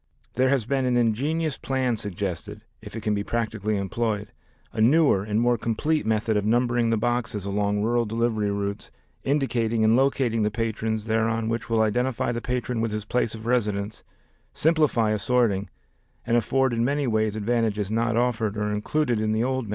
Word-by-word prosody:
There 130 +1 +2
has 135 -5 +1
been 135 +1 0
an 125 -1 +2
ingenious 140 +7 0
plan 130 -3 0
suggested 105 -1 -5 0.2
(if 105 0 -10
it 115 - -4
can 105 0 0
be 100 0 -1
practically 110 -2 -2
employed), 105 +1 -2 0.4
a 110 - -1
newer 135 -3 +4
and 105 +1 -1
more 120 0 +2
complete 150 +5 0
method 110 0 +1
of 105 - +1
numbering 120 +1 +2
the 115 - +2
boxes 110 -3 -1
along 105 +1 0
rural 120 +1 +1
delivery 110 -1 0
routes 100 0 -3 0.3
indicating 120 -5 +1
and 110 +1 +5
locating 130 -3 +2
the 105 - +2
patrons 110 -1 -2
thereon 110 0 0
which 115 0 -3
will 115 -1 +3
identify 120 +2 0
the 120 0 -3
patron 125 -1 -2
with 115 - 0
his 105 -1 -4
place 115 0 -1
of 110 0 -10
residence, 105 -3 -1 0.5
simplify 150 -9 +2
assorting, 105 -2 +1 0.6
and 115 - +1
afford 130 +3 +2
in 115 0 +1
many 140 +3 0
ways 110 -3 0
advantages 110 -2 0
not 115 +1 +1
offered 115 -4 0
or 105 0 -1
included 120 +3 0
in 110 0 0
the 110 +1 +1
old 130 -1 -1
method. - - -10
115 Hz, 180 wpm, -25 LUFS, 105-120 Hz, 0.6 s, and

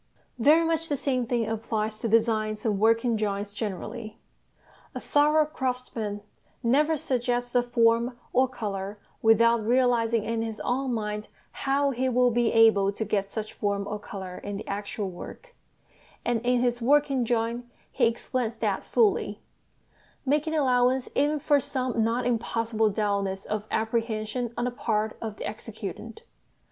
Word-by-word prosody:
Very 310 +7 +5
much 325 0 0
the 290 - 0
same 255 -3 -1
thing 235 -2 0
applies 220 -1 -2
to 230 - -2
designs 215 -1 +1
and 210 -3 +1
working 230 +2 +3
drawings 205 -1 -2
generally. 215 +2 -5 0.8
A - - -3
thorough 300 +1 +3
craftsman 250 -7 -3 0.4
never 300 +7 +3
suggests 245 -2 -1
a 245 - +4
form 235 0 +2 0.2
or 260 +1 +4
colour 205 -5 -5 0.2
without 230 +1 +4
realising 235 -2 +2
in 230 0 -1
his 225 -1 -4
own 260 +1 -1
mind 210 -2 -3 0.2
how 280 +1 +1
he 260 +1 0
will 250 0 +3
be 235 0 +2
able 220 -3 +5
to 220 +2 -4
get 200 -1 -1
such 215 -1 -5
form 200 -1 -1
or 210 +1 -4
colour 190 -3 -7
in 205 0 -5
the 210 - -8
actual 205 0 -3
work; 340 - -10 0.7
and 240 -2 +1
in 245 0 +2
his 245 -1 0
working 275 0 +3
drawing 235 +1 -1 0.2
he - - +3
explains 235 0 -2
that - - -1
fully, 435 -4 +1 0.9
making 300 +3 +1
allowance 255 -2 +2
even 295 +2 +2
for 290 0 +3
some 255 -4 -1
not 235 +2 0
impossible 230 -2 0
dulness 200 -2 -1
of 215 0 -3
apprehension 225 +1 -1
on 240 - 0
the 250 - -1
part 220 -3 -1
of 220 -2 -4
the - - -4
executant. 445 - -7
230 Hz, 150 wpm, -27 LUFS, 215-250 Hz, 0.9 s, Very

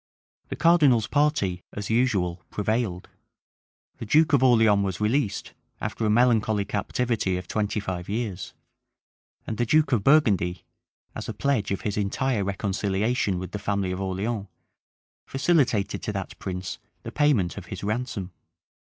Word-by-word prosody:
The - - -3
cardinal's 150 -10 +4
party, 145 - +1
as 105 +1 -4
usual, 100 -8 +1
prevailed: 105 -3 -2 0.9
the - - -5
duke 155 +6 +4
of 140 - +5
Orleans 110 -5 +5
was 95 -2 -3
released, 105 0 0 0.3
after - - -4
a 110 - +2
melancholy 110 -3 +3
captivity 105 -2 -1
of 90 -1 -7
twenty 105 0 -1
five 95 -3 -5
years:[*] 105 -4 -4 0.9
and 110 - -4
the 120 - +2
duke 155 +4 +3
of 115 -6 +2
Burgundy, 100 - +3 0.5
as - - -6
a - - -4
pledge 135 -9 0
of 100 - -2
his 105 -1 -3
entire 105 +2 0
reconciliation 100 +1 -1
with 90 0 -6
the 105 - -4
family 100 -2 -1
of 90 +1 -4
Orleans, 100 +3 -2 0.8
facilitated 135 - +1
to 105 - -3
that 95 -2 -5
prince 90 -1 -5 0.2
the - - -6
payment 140 - +2
of 95 -4 -8
his 95 - -7
ransom. 105 -3 -3
105 Hz, 145 wpm, -25 LUFS, 95-125 Hz, 0.9 s, of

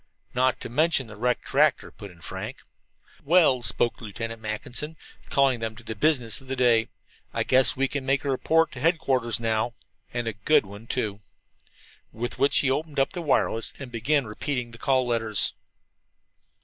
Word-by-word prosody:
"Not 130 +1 +2
to - - -5
mention 150 +2 +2
the 105 -1 -11
wrecked 120 +3 -1
tractor," - - +2
put 100 - -10
in 85 -2 -17
Frank. - - -7 0.6
"Well," 155 -5 +4
spoke 115 +1 +1
Lieutenant 115 +1 -6
Mackinson, 120 +8 -3 0.3
calling 135 -3 +3
them 110 -1 -4
to 115 - -12
the 110 - -5
business 125 -3 +2
of 135 - -17
the 135 - -2
day, 120 -3 +3 0.5
"I - - +1
guess 130 0 +4
we 135 +1 +1
can 140 0 -4
make 135 +1 0
a - - -1
report 165 +5 +2
to - - -9
headquarters 130 - +1
now 115 +1 -1 0.4
and 120 -1 -3
a 115 - -1
good 105 +7 +3
one, 100 +3 -11
too." 105 -6 -2 0.9
With 120 +2 -5
which 140 - +3
he 135 - +1
opened 150 +1 -2
up 135 - +1
the 180 - -4
wireless 130 -6 +1
and 135 -3 -9
began 130 +4 +1
repeating 125 +2 -4
the 115 - -13
call 130 -2 +2
letters. 110 -5 -1
125 Hz, 175 wpm, -26 LUFS, 115-140 Hz, 0.9 s, Well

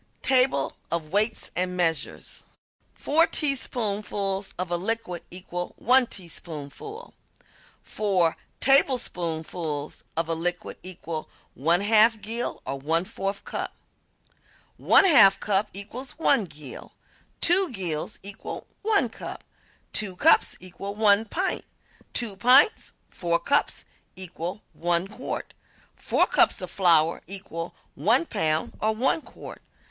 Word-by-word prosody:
TABLE 255 - +2 0.2
OF 165 -2 -2
WEIGHTS 215 +3 +1
AND 180 0 -1
MEASURES 165 -5 -2 0.5
Four 325 +3 +3
teaspoonfuls 205 -8 -1
of 180 -1 -3
a - - +2
liquid 185 -2 -2
equal 175 0 -6
1 250 +1 +4
tablespoonful. 175 - -8 0.7
Four 185 -6 +1 0.2
tablespoonfuls 170 - +1
of 165 -1 0
a 165 - 0
liquid 175 +2 -3
equal 165 -3 -6 0.3
1/2 210 - +4
gill 230 +3 -3
or 135 +1 -4
1/4 170 +6 -2
cup. - - -4 1.0
One - - +5
half 215 - +7
cup 205 0 +1
equals 230 +7 -6
1 280 -8 +3
gill. 150 -6 -11 0.5
Two 365 +2 +4
gills 175 -8 -3
equal 200 0 -7 0.2
1 410 - +2
cup. - - -8 0.5
Two 200 -4 -2
cups - - +4
equal 185 +3 -7
1 210 0 +4
pint. 365 - -1 0.5
Two 225 -5 -1
pints 255 - +4 0.2
(4 170 -1 0
cups) 170 +12 0 0.3
equal 180 +1 -6
1 175 +2 0
quart. - - -6 0.4
Four - - +2
cups - - +3
of - - -5
flour 165 -3 +3
equal 180 -3 -6 0.2
1 225 - +3
pound 160 - -1
or 220 0 +1
1 265 +7 +1
quart. - - -11
195 Hz, 115 wpm, -26 LUFS, 170-230 Hz, 1.0 s, half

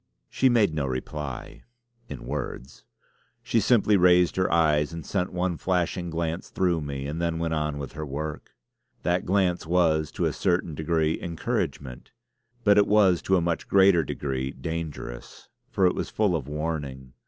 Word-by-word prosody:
She 130 - +3
made 110 -8 +3
no 75 -3 -1
reply 65 +1 -5 0.5
in - - -7
words. - - -6 0.6
She 115 -1 +1
simply 105 -1 +4
raised 90 -1 +4
her 95 0 +1
eyes 75 -3 +3
and 85 -1 -7
sent 90 -2 -1
one 90 -1 -1
flashing 90 0 -1
glance 85 +1 -3
through 90 -3 0
me, 70 -2 -5
and 75 +4 -4
then 85 -1 0
went 80 0 -1
on 75 -2 -1
with 70 -2 -6
her 80 - -6
work. 75 +1 -6 0.5
That 90 +2 0
glance 90 -3 +1
was 80 -3 +2
to - - -1
a - - 0
certain 85 -3 0
degree 80 +1 0
encouragement; 70 - -4 0.5
but 105 0 +5
it 100 - +4
was 100 -5 +4
to 95 - +2
a - - +1
much 85 0 -2
greater 95 -4 +5
degree 65 -2 -3
dangerous, 75 -4 -6 0.2
for 95 - +2
it 90 - +4
was - - -3
full 105 -5 +1
of 70 -5 -3
warning. 75 -4 -4
85 Hz, 165 wpm, -26 LUFS, 75-90 Hz, 0.6 s, but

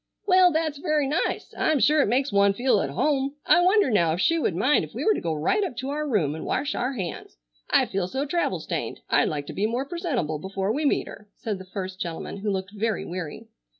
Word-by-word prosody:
"Well, 370 -2 +6
that's 310 -2 -1
very 305 -3 +1
nice. 300 +6 -2
I'm 310 - +2
sure 300 +3 +4
it - - +2
makes 265 +5 +1
one 200 0 +4
feel 250 +4 +2
at - - -2
home. 275 -1 0
I - - +5
wonder 370 - +4
now 170 -6 +3
if 170 - -3
she 330 - +3
would 185 - 0
mind 255 +11 +3
if - - -10
we - - -3
were 435 - +5
to - - -3
go 165 - -2
right 165 - +1
up 255 -11 -4
to 265 +2 -3
our 300 +1 -2
room 185 - +1
and 160 - -6
wash 285 +2 -1
our 250 +3 -1
hands. 185 -9 -6 0.3
I - - +4
feel 190 -2 -2
so 265 +8 -2
travel 340 +4 0
stained. - - -4
I'd - - +4
like 145 -2 -3
to - - -7
be 205 +2 0
more 245 +4 -2
presentable 275 - -2
before 195 +3 -2
we 300 +4 -1
meet 280 - +2
her," 215 -1 -11
said 210 -4 -4
the 190 - -9
first 185 -1 -6
gentleman, 170 +2 -5
who 205 +1 -3
looked 190 -1 -2
very 215 -1 -2
weary. 175 -4 -6
240 Hz, 245 wpm, -25 LUFS, 190-300 Hz, 0.3 s, Well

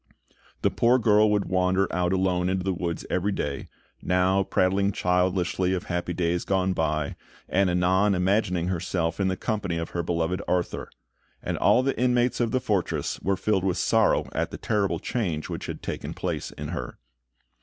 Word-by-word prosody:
The - - +3
poor 120 +2 +3
girl 110 -3 +4
would 105 -1 +1
wander 95 +1 +1
out 90 0 +1
alone 90 -1 +1
into 95 -1 -1
the 95 0 0
woods 85 -1 -3
every 95 +3 +1
day, 75 -7 -3 0.3
now 90 +1 +2
prattling 95 +1 +1
childishly 90 +1 +1
of 90 - -3
happy 90 0 -3
days 85 0 0
gone 95 -1 +1
by, 75 -3 -1 0.3
and 95 0 +2
anon 95 +3 +3
imagining 90 -1 +1
herself 85 -1 -1
in 95 - +2
the 95 0 -1
company 100 -6 -2
of 85 0 -4
her 85 - -1
beloved 85 +2 -1
Arthur; 90 -1 -1 0.5
and - - -2
all 125 - +4
the 135 0 -1
inmates 125 0 +2
of 120 -2 +1
the 130 - +1
fortress 105 -8 -1
were 95 0 0
filled 100 -2 +1
with 95 -1 0
sorrow 110 +4 +2
at - - -1
the - - -7
terrible 100 -5 0
change 85 -8 -3
which - - -5
had - - -6
taken - - -5
place - - -3
in - - -7
her. - - -5
95 Hz, 175 wpm, -26 LUFS, 90-100 Hz, 0.5 s, girl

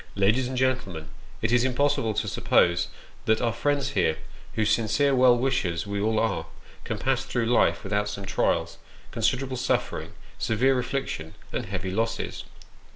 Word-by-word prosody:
Ladies 110 +6 +2
and 130 0 -4
gentlemen, 100 -12 -1 0.3
it - - +1
is 120 0 +4
impossible 130 -4 +1
to - - -1
suppose 85 0 +2 0.4
that 110 0 +3
our 115 -2 0
friends 140 +3 0
here, 80 - +1 0.4
whose 110 -1 +2
sincere 120 +6 +2
well 125 -1 +6
wishers 95 -10 0
we 100 0 -2
all 110 +1 +1
are, 95 -8 -1 0.4
can - - -3
pass - - 0
through 120 -2 -1
life 120 +1 +3
without 105 +1 0
some 100 -1 -6
trials, 95 - 0 0.3
considerable 125 +3 0
suffering, 125 - -1 0.3
severe 125 +4 +2
affliction, 125 - -3 0.2
and - - -3
heavy 95 -1 -3
losses 115 +3 -2
115 Hz, 155 wpm, -26 LUFS, 100-130 Hz, 0.4 s, well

